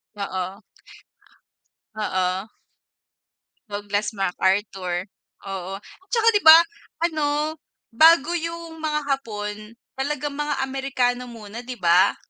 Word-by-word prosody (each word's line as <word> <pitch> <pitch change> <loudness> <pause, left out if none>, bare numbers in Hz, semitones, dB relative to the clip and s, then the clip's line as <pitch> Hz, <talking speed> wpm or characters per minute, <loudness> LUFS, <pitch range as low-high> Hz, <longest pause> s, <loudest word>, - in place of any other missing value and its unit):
Oo. 190 0 -4 1.3
Oo. 190 0 -1 1.2
Douglas 205 +1 -2
MacArthur, 190 -1 0 0.4
oo, 190 -1 -5 0.4
tsaka. 460 -1 +1
'Di 415 - +3
ba, 315 +1 +12 0.5
ano, 305 -1 -1 0.4
bago 320 +3 +6
yung 335 -1 -6
mga 300 -1 0
Hapon, 215 -4 -4 0.2
talagang 290 +1 -2
mga 295 0 -2
Amerikano 255 -2 -1
muna, 225 0 -9
'di 250 -1 -6
ba? 175 0 +4
235 Hz, 95 wpm, -23 LUFS, 195-295 Hz, 1.3 s, ba